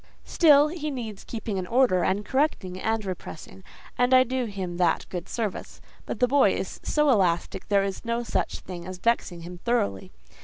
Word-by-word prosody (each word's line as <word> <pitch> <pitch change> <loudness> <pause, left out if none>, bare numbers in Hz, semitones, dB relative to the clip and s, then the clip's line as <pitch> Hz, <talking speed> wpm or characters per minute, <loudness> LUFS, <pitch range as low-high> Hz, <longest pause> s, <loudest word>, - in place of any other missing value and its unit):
"Still 295 -3 +5
he 305 -2 -4
needs 225 -7 -6
keeping 220 -3 -4
in 185 -1 -3
order, 230 -7 +3
and 200 +2 0
correcting, 215 -9 -1
and 220 -1 -1
repressing, 185 0 -8 0.4
and 250 +1 +4
I 255 - +7
do 255 0 -2
him 190 -5 -5
that 175 -2 +2
good 180 0 -6
service; 215 -5 -4 0.3
but - - -4
the 250 - +4
boy 280 +2 +4
is - - -5
so 300 -2 +2
elastic 185 -3 +1
there 200 -1 +3
is 195 -1 -4
no 235 +1 -1
such - - -2
thing 175 -1 -8
as 185 0 -6
vexing 180 -5 0
him 175 +1 -9
thoroughly. 100 - -1
210 Hz, 185 wpm, -26 LUFS, 185-250 Hz, 0.4 s, I